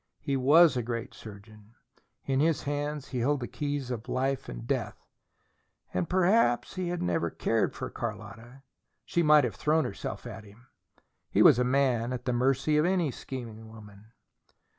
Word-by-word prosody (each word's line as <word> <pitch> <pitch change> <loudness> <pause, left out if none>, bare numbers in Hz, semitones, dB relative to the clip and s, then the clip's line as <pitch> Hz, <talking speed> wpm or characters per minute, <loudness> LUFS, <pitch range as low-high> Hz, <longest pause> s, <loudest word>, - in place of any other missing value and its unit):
He 140 -2 -2
WAS 145 +5 +5
a 125 - 0
great 115 +1 -5
surgeon: 105 +1 -13 0.5
in 135 -1 0
his 160 +1 +1
hands 145 0 -3
he 130 - -3
held 140 +4 +1
the 120 - -5
keys 145 -3 -4
of 115 -2 -6
life 135 +1 -1
and - - -7
death. - - -2 1.0
And 90 -1 -1
perhaps 185 - +2
he 185 -1 -3
had 175 0 -3
never 85 -1 0
cared - - -1
for - - -5
Carlotta: 120 +4 -7 0.4
she 170 - 0
might 150 -2 +6
have 120 -4 -1
thrown 150 +9 +1
herself 100 - -6
at 110 - -8
him. 105 +4 -18 0.6
He - - +4
was - - +7
a - - +3
man, 125 -2 +1
at 125 -1 -6
the 125 - 0
mercy 135 +4 +1
of 150 - +3
any 180 -5 +1
scheming 115 -4 -8
woman. 105 -1 -14
130 Hz, 170 wpm, -28 LUFS, 115-145 Hz, 1.0 s, was